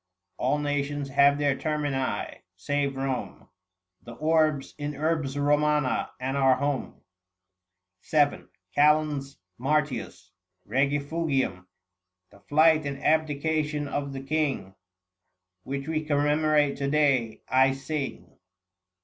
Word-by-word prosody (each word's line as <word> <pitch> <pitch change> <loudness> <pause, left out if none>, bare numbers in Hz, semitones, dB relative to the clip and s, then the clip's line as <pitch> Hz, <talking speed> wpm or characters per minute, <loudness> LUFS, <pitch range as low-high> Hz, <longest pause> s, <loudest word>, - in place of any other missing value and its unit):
All 135 +4 +1
nations 145 -1 -2
have 140 +1 +4
their 145 -2 +1
termini, 145 -3 -2
save 140 +9 -1
Kome: 135 -1 -4 0.5
730 - - -33
The 120 - -9
Orbs 155 0 +1
is 145 0 -4
Urbs 150 -2 -1
Romana, 150 -1 +1
and 130 +1 -2
our 135 -2 +4
home. 140 0 -3 1.1
VII. 145 -2 +2 0.3
TCAL. 150 -2 +2 0.2
MART. 150 +3 +1 0.7
REGIFUGIUM. 140 - -1 0.6
The 100 - -18
flight 155 0 +4
and 140 0 -6
abdication 155 -1 0
of 140 0 -3
the 135 -1 -6
king, 140 -9 -1 0.9
Which 135 +5 -5
we 155 -1 -1
commemorate 150 0 +2
to 140 0 -1
day, 135 -7 +1
I 130 +1 +4
sing. 135 +1 -5
145 Hz, 105 wpm, -27 LUFS, 135-150 Hz, 1.1 s, have